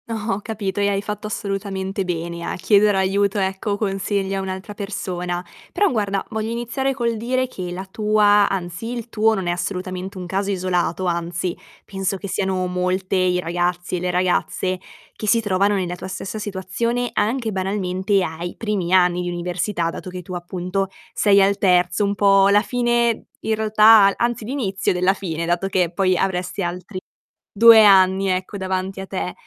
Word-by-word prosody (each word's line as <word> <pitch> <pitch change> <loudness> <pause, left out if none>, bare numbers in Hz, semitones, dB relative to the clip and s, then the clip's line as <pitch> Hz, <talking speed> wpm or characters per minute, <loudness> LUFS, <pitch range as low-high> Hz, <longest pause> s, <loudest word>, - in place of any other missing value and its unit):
Ho 215 -2 -2
capito, 205 -3 -4
e 200 - +2
hai 200 0 0
fatto 210 +1 -5
assolutamente 195 -2 -3
bene 170 -1 -4
a - - -3
chiedere 205 +2 +3
aiuto, 195 +1 +1
ecco, 195 +1 -1
consigli 195 -1 -1
a 195 - -1
un'altra 190 +2 -6
persona. 180 -3 -4 0.3
Però 410 -1 +2
guarda, 200 - -1
voglio 220 0 -2
iniziare 240 +3 -2
col 235 -3 -1
dire 255 +3 -1
che 185 -7 -6
la 185 +2 -5
tua 210 0 +3
anzi, 185 +4 -4
il 240 -2 -5
tuo 220 0 +2
non 190 -3 -3
è - - +2
assolutamente 185 +1 -4
un 180 - -6
caso 195 +3 -2
isolato, 185 -1 -1
anzi, 170 0 -2 0.3
penso 195 0 -2
che 200 - -7
siano 190 -1 -1
molte 180 +1 -1
i 180 -1 +2
ragazzi 175 +1 -1
e - - -3
le 180 0 -1
ragazze 185 +1 0 0.4
che 215 - -6
si 230 +3 +4
trovano 205 -1 +1
nella 180 -2 -2
tua 180 - -8
stessa 190 +3 -5
situazione, 215 +5 -2
anche 225 +1 0
banalmente 190 0 0
ai 170 +1 -5
primi 205 -6 -2
anni 180 -1 +4
di 175 - -3
università, 175 0 -2
dato 185 - -8
che 180 0 -7
tu 185 - -8
appunto 180 +2 -3 0.3
sei 200 -1 +4
al 195 +1 +3
terzo, 180 +1 +3
un 200 0 0
po' 195 0 +5
la 205 +1 +5
fine 240 -2 +1 0.2
i 220 - -1
realtà 215 0 +6
al 200 - +2
anzi, 235 -1 -1
l'inizio 210 -6 -1
della 180 +1 +2
fine, 170 -4 -4
dato 175 +3 0
che 180 -3 +1
poi 185 0 +2
avresti 185 +1 -1
altri 180 +2 -5 0.6
2 225 0 +9
anni, 190 -1 +5
ecco, 185 +2 -2
davanti 190 0 -3
a 190 - -6
te. 185 -1 -3
195 Hz, 175 wpm, -21 LUFS, 180-210 Hz, 0.6 s, 2